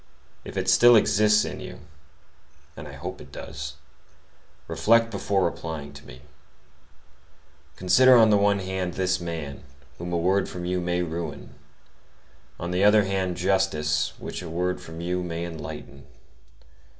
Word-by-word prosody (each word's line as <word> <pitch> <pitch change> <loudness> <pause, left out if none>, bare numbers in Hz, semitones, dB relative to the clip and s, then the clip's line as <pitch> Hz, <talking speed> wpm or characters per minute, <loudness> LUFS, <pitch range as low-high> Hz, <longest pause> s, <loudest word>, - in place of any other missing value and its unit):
If - - -8
it - - -1
still 120 0 +7
exists 105 0 +4
in - - -6
you,—and - - -15
I - - -10
hope - - -7
it - - -14
does,—reflect 115 +1 -3
before 100 -2 0
replying 80 -4 -5
to 70 - -13
me: 65 +2 -13 1.5
consider 130 +7 +6
on 110 -2 +6
the 105 - +5
one 100 0 +3
hand, 95 -2 -3
this 95 0 0
man, 80 -5 -5 0.4
whom 85 +1 -5
a 85 - 0
word 95 +4 +1
from 90 -1 -6
you 90 0 -1
may 90 0 -1
ruin; 85 0 -6 1.1
on 85 +1 -4
the 90 +2 +1
other 105 +1 +6
hand, 95 -2 -2
justice, 80 -5 0
which - - -6
a 85 - -7
word 90 +2 -2
from 80 +1 -9
you 90 +1 -2
may 85 -1 -4
enlighten. 70 -4 -9
90 Hz, 140 wpm, -25 LUFS, 85-100 Hz, 1.5 s, still